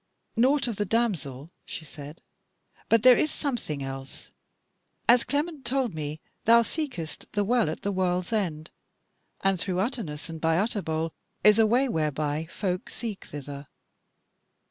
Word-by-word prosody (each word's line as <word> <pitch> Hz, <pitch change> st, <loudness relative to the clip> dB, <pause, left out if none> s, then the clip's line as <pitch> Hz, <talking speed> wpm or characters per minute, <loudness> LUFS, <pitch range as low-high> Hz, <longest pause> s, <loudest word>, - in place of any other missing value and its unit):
"Naught 260 Hz, +4 st, +3 dB
of 230 Hz, -4 st, -3 dB
the 210 Hz, -, +1 dB
damsel," 170 Hz, -, -1 dB
she 160 Hz, -, -7 dB
said. 150 Hz, +1 st, -10 dB, 0.7 s
"But 230 Hz, -1 st, +4 dB
there 255 Hz, -1 st, +9 dB
is 305 Hz, -, +2 dB
something 235 Hz, -, -2 dB
else. 135 Hz, 0 st, -7 dB, 0.8 s
As 240 Hz, 0 st, +7 dB
Clement 295 Hz, 0 st, -2 dB
told 255 Hz, -2 st, 0 dB
me, 155 Hz, 0 st, -4 dB, 0.3 s
thou 235 Hz, +1 st, +7 dB
seekest 245 Hz, -, -4 dB
the 205 Hz, -, +2 dB
Well 235 Hz, -4 st, +2 dB
at 160 Hz, -, -5 dB
the 200 Hz, -, 0 dB
World's 185 Hz, +1 st, 0 dB
End, 170 Hz, -7 st, -1 dB, 0.7 s
and 195 Hz, -2 st, +2 dB
through 185 Hz, +1 st, -2 dB
Utterness 190 Hz, -, -2 dB
and 165 Hz, -1 st, -7 dB
by 165 Hz, 0 st, +3 dB
Utterbol 165 Hz, -6 st, -1 dB, 0.3 s
is 210 Hz, +1 st, +7 dB
a 220 Hz, -, +6 dB
way 250 Hz, +5 st, +3 dB
whereby 155 Hz, -, -1 dB
folk 185 Hz, -3 st, -2 dB
seek 225 Hz, -4 st, -5 dB
thither. 140 Hz, 0 st, -8 dB
190 Hz, 145 wpm, -27 LUFS, 155-235 Hz, 0.8 s, there